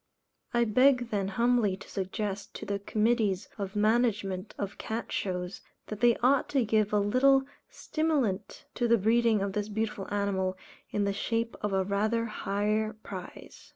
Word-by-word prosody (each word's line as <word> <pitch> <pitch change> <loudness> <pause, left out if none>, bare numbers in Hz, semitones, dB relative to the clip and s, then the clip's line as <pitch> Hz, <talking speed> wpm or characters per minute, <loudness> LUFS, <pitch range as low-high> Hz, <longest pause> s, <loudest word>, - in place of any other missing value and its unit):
I 240 0 +3
beg 250 +2 +3
then 200 -2 0
humbly 230 -1 +2
to - - -12
suggest 195 +1 -4
to - - -6
the 200 0 -2
committees 210 -2 +1
of 200 0 -4
management 210 -3 +1
of 200 -1 -5
cat 225 +2 -4
shows, 180 -1 -3 0.3
that 215 - -5
they 240 0 +4
ought 265 +2 +3
to 270 -5 +2
give 215 -1 +2
a 210 - +3
little 265 +6 +4 0.3
stimulant 280 - -1
to 240 - 0
the 235 0 +5
breeding 225 0 +3
of 200 -1 -2
this 210 +1 -2
beautiful 215 -2 -3
animal, 190 -2 0 0.3
in 205 - 0
the 200 0 0
shape 230 +3 -1
of 210 - -1
a 190 0 +2
rather 215 +4 0
higher 215 0 -1
prize. 185 -2 -9
210 Hz, 160 wpm, -29 LUFS, 200-235 Hz, 0.3 s, the